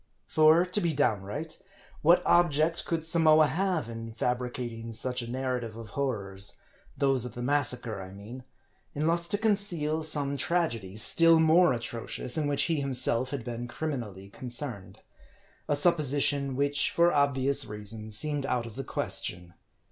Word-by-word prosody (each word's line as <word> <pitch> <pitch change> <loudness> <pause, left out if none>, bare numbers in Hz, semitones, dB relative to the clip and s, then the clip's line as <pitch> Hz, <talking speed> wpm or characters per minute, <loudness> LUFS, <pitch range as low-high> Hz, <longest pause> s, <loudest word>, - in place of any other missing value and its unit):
For, 155 +3 +4
to 185 +3 -2
be 170 -2 0
downright, 135 +3 -2 0.4
what 170 +3 +4
object 165 -1 +2
could 165 -1 -2
Samoa 160 -1 +5
have, 170 -1 -1
in 115 0 -7
fabricating 120 -1 -4
such 125 +2 -2
a 120 - -7
narrative 125 -3 -3
of 115 -3 -10
horrors 100 -8 -4 0.4
those 135 -3 +1
of 125 -2 -7
the 120 - -5
mas 145 +1 +2
sacre, 115 -5 -5
I 95 - -9
mean 105 +6 -10 0.5
unless 165 +3 +1
to 205 - 0
conceal 195 -8 +1
some 145 -3 -2
tragedy, 120 - -2
still 165 +8 +6
more 160 +2 +5
atrocious, 115 0 -4
in 155 -2 -1
which 145 -1 +1
he 165 -3 0
himself 130 -2 +3
had 140 -4 -5
been 120 +1 -6
criminally 120 -10 -6
con 125 +4 -8
cerned?. 120 -6 -3 0.7
A 145 - +1
supposition, 145 -3 +2
which, 145 +1 +2
for 170 +1 +2
obvious 140 -1 +1
reasons, 105 0 -3
seemed 145 +2 0
out 125 -2 -1
of 115 0 -10
the 135 - -4
question. 90 -7 -4
135 Hz, 155 wpm, -28 LUFS, 115-155 Hz, 0.7 s, still